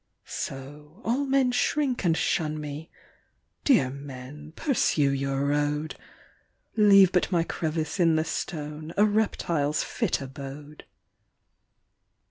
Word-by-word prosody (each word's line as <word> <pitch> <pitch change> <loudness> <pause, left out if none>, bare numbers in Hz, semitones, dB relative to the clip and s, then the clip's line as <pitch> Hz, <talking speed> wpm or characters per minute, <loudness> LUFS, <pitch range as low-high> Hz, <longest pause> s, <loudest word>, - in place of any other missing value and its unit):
So, 150 +5 -7
all 255 +5 +1
men 265 -2 +3
shrink 260 0 0
and 165 -3 +2
shun 155 -2 0
me! 150 +2 -6 0.7
Dear 220 - +4
men, 140 +2 -9
pursue 160 - +2
your 135 0 -1
road! 150 +1 0 0.8
Leave 200 -4 +7
but 180 +1 +1
my 170 -2 +3
crevice 160 +1 -3
in 165 -2 +4
the 155 0 +1
stone, 155 -1 -5
a 205 - +6
reptile's 170 -8 0
fit - - -1
abode! 140 +2 -9
155 Hz, 110 wpm, -27 LUFS, 145-195 Hz, 0.8 s, Leave